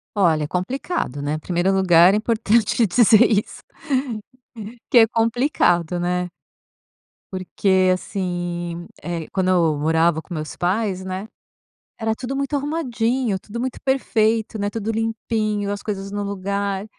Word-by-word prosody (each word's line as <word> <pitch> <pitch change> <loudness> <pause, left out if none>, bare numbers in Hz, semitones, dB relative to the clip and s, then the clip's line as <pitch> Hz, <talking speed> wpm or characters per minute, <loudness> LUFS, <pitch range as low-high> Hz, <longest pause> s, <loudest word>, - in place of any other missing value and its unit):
Olha, 165 -6 +3
é - - -2
complicado, 185 - -3
né. 150 +2 -2
1º 175 +3 0
lugar 185 -1 +5
é - - +3
importante 225 0 +2
dizer 220 +3 +5
isso, 210 -1 -1 1.3
que 245 - +7
é 225 - +7
complicado, 225 - +1
né. 180 0 -1 1.0
Porque 185 0 +1
assim, 175 -2 -4
eh, 170 -2 -4
quando 190 -1 0
eu 165 -5 +3
morava 160 +2 +2
com 175 - -10
meus 155 -1 -5
pais, 190 +1 -1
né, 190 +2 -5 0.7
era 220 0 0
tudo 255 +3 -5
muito 275 +1 -2
arrumadinho, 255 -7 -1
tudo 215 +4 -8
muito 255 +1 -3
perfeito, 225 -4 +1
né, 205 0 -1
tudo 220 +1 -3
limpinho, 220 -2 -1
as 205 0 -4
coisas 195 -2 -5
no 205 0 -3
lugar, 200 0 -2
200 Hz, 135 wpm, -21 LUFS, 175-225 Hz, 1.3 s, que